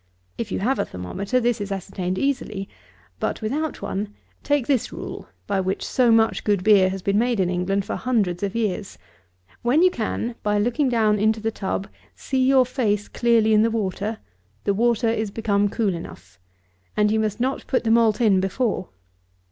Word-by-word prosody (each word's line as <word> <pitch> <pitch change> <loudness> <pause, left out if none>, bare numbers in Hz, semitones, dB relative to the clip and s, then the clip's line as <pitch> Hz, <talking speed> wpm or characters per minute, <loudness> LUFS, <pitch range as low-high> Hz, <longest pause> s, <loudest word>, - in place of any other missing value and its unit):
If 225 -4 -5
you - - -1
have 260 +6 +1
a - - +1
thermometer, 190 - -2
this 240 -3 0
is 200 0 -4
ascertained 185 -1 -3
easily; 215 -6 -2 0.5
but, - - -2
without 295 +7 -2
one, 205 +1 -4 0.3
take 290 -3 +1
this 265 -4 0
rule, - - -7 0.2
by 200 -1 0
which 190 +1 -2
so 250 -2 +2
much 225 0 +3
good 205 -3 +1
beer 200 -3 +5
has 190 -1 -5
been 200 +1 +2
made 240 -2 +1
in 180 -1 +1
England 190 +2 0
for - - -3
hundreds 205 -9 0
of 200 +1 -2
years: 210 -3 -2 0.6
when 265 +8 +3
you 365 - +5
can, 235 -1 -3
by 210 0 +1
looking 245 +6 +1
down 215 -3 +2
into 220 +1 +2
the 225 +1 -1
tub, 195 -1 -3 0.3
see 265 -1 -1
your 260 0 +5
face 215 -5 -1
clearly 230 -2 +2
in 210 - +5
the 225 - +3
water, 215 0 -2 0.5
the 200 - +1
water 235 +2 +2
is 220 -2 0
become 205 -1 +1
cool 205 -3 0
enough; 95 - -10 0.6
and 210 0 +3
you 220 - +2
must 215 0 -1
not 260 +3 -2
put 255 - +1
the 225 - +1
malt 225 -1 +4
in 210 -5 +4
before. 195 0 -1
215 Hz, 190 wpm, -23 LUFS, 195-235 Hz, 0.6 s, beer